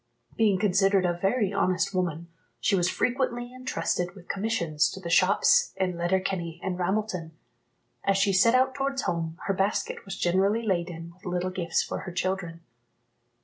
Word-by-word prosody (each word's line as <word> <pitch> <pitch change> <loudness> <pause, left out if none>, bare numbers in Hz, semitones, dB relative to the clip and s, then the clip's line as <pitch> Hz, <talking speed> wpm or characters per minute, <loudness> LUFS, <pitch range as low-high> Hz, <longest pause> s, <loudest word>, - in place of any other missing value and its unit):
Being 210 -4 +3
considered 195 -1 +3
a 175 - +2
very 195 +3 0
honest 185 0 +1
woman, 170 -3 -2 0.3
she 200 - +2
was 180 -1 +2
frequently 245 0 -1
entrusted 230 -8 -2
with 180 -3 -14
commissions 180 -7 0
to - - -7
the 170 -3 -5
shops 185 +3 +4
in 185 -2 -1
Letterkenny 175 -1 -1
and 185 -1 -2
Ramelton. 180 -3 -2 0.7
As 195 -1 +2
she 195 0 +2
set 230 +6 +5
out 260 +1 +3
towards 275 0 -2
home, 165 -1 -2
her 195 - +1
basket 195 +2 -1
was 195 -1 -7
generally 195 +6 +2
laden 170 -4 -2
with 180 - -27
little 180 0 -1
gifts 175 -2 0
for - - -4
her 190 - -7
children. 180 -2 -3
190 Hz, 160 wpm, -27 LUFS, 175-200 Hz, 0.7 s, set